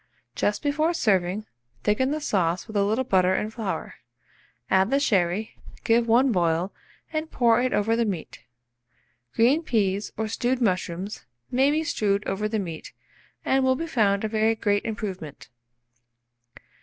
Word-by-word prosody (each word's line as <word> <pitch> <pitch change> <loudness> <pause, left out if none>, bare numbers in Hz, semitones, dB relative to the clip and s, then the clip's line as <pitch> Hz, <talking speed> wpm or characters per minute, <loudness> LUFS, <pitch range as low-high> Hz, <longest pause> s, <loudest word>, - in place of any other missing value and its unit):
Just 205 +10 -1
before 310 +4 +1
serving, 195 - +1 0.4
thicken 215 +6 +2
the 305 +2 -1
sauce 185 - 0
with 220 - -11
a 200 - +3
little 220 +6 +1
butter 190 -5 +2
and 215 +2 -2
flour; 215 -5 -4 0.7
add 190 +4 +3
the 275 +2 +2
sherry, 200 -4 0 0.3
give 230 +1 +3
one 245 +3 +4
boil, 175 -1 0 0.4
and 310 0 -2
pour 235 -1 +3
it 255 0 0
over 225 +2 +1
the 235 - +2
meat. 195 -8 -4 1.0
Green 255 +8 +4
peas, 205 - 0
or 220 +1 -1
stewed 245 +3 -1
mushrooms, 185 -2 -2 0.3
may 265 +3 +3
be 310 +2 +1
strewed 210 -8 0
over 210 +2 -1
the 220 - -1
meat, 170 -6 -6 0.5
and 265 0 +2
will 260 0 +3
be 330 - -3
found 210 -10 +1
a - - +1
very 220 +1 +1
great 205 -2 0
improvement. 195 - -6
215 Hz, 155 wpm, -25 LUFS, 195-250 Hz, 1.0 s, one